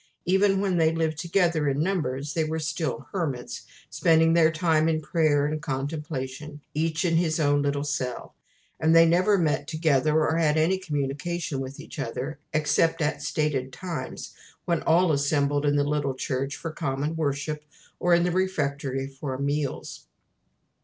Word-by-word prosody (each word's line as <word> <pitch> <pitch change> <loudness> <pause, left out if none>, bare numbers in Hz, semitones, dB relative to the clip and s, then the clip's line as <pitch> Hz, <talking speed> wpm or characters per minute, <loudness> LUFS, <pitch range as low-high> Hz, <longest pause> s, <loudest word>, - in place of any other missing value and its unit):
Even 195 +2 +3
when 190 -3 +1
they 160 -1 +4
lived 160 -1 -1
together 170 -3 +1
in 140 +1 -1
numbers 150 -6 -2
they 160 - +1
were 155 +1 -2
still 155 -2 -3
hermits, 145 -10 -4 0.2
spending 165 0 +4
their 165 -1 +5
time 160 -1 +2
in 160 -1 +1
prayer 155 -2 +2
and 155 +1 -2
contemplation, 145 0 -4
each 160 +2 0
in 165 -2 +2
his 165 -1 +1
own 145 -1 +3
little 145 0 0
cell; 130 -4 -3 0.5
and 160 +1 +3
they 165 0 +8
never 185 +5 +3
met 150 -4 0
together, 155 -2 +2
or 160 +1 +1
had 155 -2 +2
any 175 +5 +2
communication 150 -1 -3
with 135 +1 -6
each - - -10
other, 135 +3 -4
except 155 +2 +2
at 150 -1 -1
stated 145 -4 -1
times, 165 -4 -6 0.3
when 170 -2 0
all 170 +1 +3
assembled 145 0 +1
in 145 - +3
the 145 - +3
little 145 -2 -1
church 135 +2 -2
for 165 - -5
common 145 0 -2
worship, 150 0 -2 0.4
or 175 -1 +4
in 170 - +3
the 180 - +1
refectory 145 -7 -1
for 135 -1 -5
meals. 140 0 -3
155 Hz, 160 wpm, -26 LUFS, 140-165 Hz, 0.5 s, they